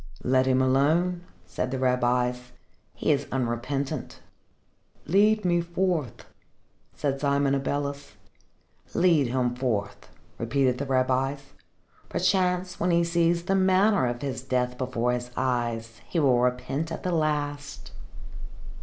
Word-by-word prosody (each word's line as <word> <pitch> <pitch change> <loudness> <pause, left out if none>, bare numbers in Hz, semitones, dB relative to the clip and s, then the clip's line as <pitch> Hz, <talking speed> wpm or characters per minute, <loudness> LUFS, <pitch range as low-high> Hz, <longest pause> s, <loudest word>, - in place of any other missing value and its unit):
"Let 130 +1 +2
him 130 0 +3
alone," 165 +7 +2 0.2
said 95 +7 -3
the 130 - -3
rabbis. 125 -1 0 0.4
"He - - 0
is - - 0
unrepentant." 130 +2 -3 0.9
"Lead 210 +3 +3
me 175 -1 +3
forth," 170 - -2 0.7
said 140 -1 -2
Simon 140 -1 +2
Abeles. 140 +1 -3 0.8
"Lead 165 -7 +4
him 125 0 0
forth," 115 -6 -3 0.3
repeated 125 +2 +1
the 140 - -3
rabbis. 135 +2 0 0.6
"Perchance, 180 -1 0
when 175 - +1
he 170 0 +3
sees 170 0 +1
the 190 +2 0
manner 190 - +3
of 120 +1 -4
his 135 -3 -3
death 125 -1 -1
before 125 -1 -1
his 125 0 -3
eyes, 120 -3 -2
he 170 - 0
will 130 -5 +4
repent 125 +6 -1
at - - -5
the 180 - -1
last." 145 -3 -2
135 Hz, 125 wpm, -26 LUFS, 125-170 Hz, 0.9 s, Lead